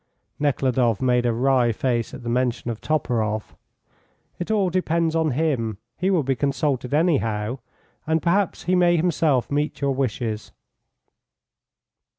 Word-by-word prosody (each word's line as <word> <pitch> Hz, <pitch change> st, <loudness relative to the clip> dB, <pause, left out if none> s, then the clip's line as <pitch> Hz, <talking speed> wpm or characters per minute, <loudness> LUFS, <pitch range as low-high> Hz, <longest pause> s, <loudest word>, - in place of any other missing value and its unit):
Nekhludoff 130 Hz, -6 st, +1 dB
made 125 Hz, -1 st, +2 dB
a -, -, +2 dB
wry 125 Hz, 0 st, +2 dB
face 120 Hz, 0 st, -1 dB
at 130 Hz, -, -9 dB
the -, -, -7 dB
mention 120 Hz, -1 st, 0 dB
of 110 Hz, -, -7 dB
Toporoff. 110 Hz, -8 st, -1 dB, 0.9 s
"It 175 Hz, -, -4 dB
all 200 Hz, -4 st, +2 dB
depends 165 Hz, -2 st, 0 dB
on 160 Hz, -1 st, +2 dB
him. 130 Hz, -7 st, -1 dB, 0.2 s
He 185 Hz, +3 st, 0 dB
will 180 Hz, -6 st, +2 dB
be 135 Hz, 0 st, 0 dB
consulted, 140 Hz, -2 st, -1 dB
anyhow. 125 Hz, -, +1 dB, 0.5 s
And 160 Hz, +1 st, +2 dB
perhaps 175 Hz, +4 st, 0 dB
he 180 Hz, -, 0 dB
may 175 Hz, -1 st, +4 dB
himself 155 Hz, -7 st, +1 dB
meet 145 Hz, +1 st, -1 dB
your 140 Hz, -1 st, +1 dB
wishes." 115 Hz, -4 st, -3 dB
135 Hz, 140 wpm, -23 LUFS, 120-160 Hz, 0.9 s, may